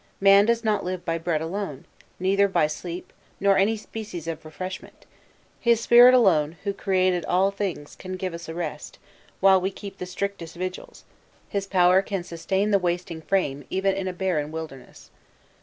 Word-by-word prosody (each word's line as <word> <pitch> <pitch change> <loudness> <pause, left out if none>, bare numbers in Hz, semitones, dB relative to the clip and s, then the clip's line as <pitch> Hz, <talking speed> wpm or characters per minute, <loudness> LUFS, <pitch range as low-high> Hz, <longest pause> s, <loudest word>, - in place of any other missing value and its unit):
'Man 195 +1 +6
does 235 0 +1
not 210 -2 +1
live 180 0 -4
by 165 -1 -1
bread 165 -2 -1
alone;' 165 -4 -5 0.3
neither 195 +2 +3
by 190 - +2
sleep, 170 +3 -6 0.3
nor 200 0 +4
any 210 +4 +2
species 210 -6 -8
of 165 -2 -5
refreshment. 185 +4 -8 0.5
His 235 -2 +3
Spirit 240 +2 +7
alone, 165 -9 +3
who 200 -1 -1
created 185 -2 +1
all 190 +2 +2
things, 190 -7 -4
can 185 0 -8
give 185 -1 -4
us 170 0 -8
a 160 - -6
rest, 155 -3 -5 0.4
while 190 -1 +6
we 190 - 0
keep 195 0 -10
the 180 - -5
strictest 185 -3 -5
vigils; 185 +1 -7 0.4
His 200 -1 -2
power 185 -1 +4
can 195 -2 -4
sustain 190 +5 -1
the 200 - +4
wasting 175 -2 -3
frame, 145 -6 -1
even 195 +1 +1
in 190 -1 -3
a 185 - -3
barren 175 -5 -1
wilderness." 160 -5 -9
185 Hz, 175 wpm, -25 LUFS, 170-200 Hz, 0.5 s, Spirit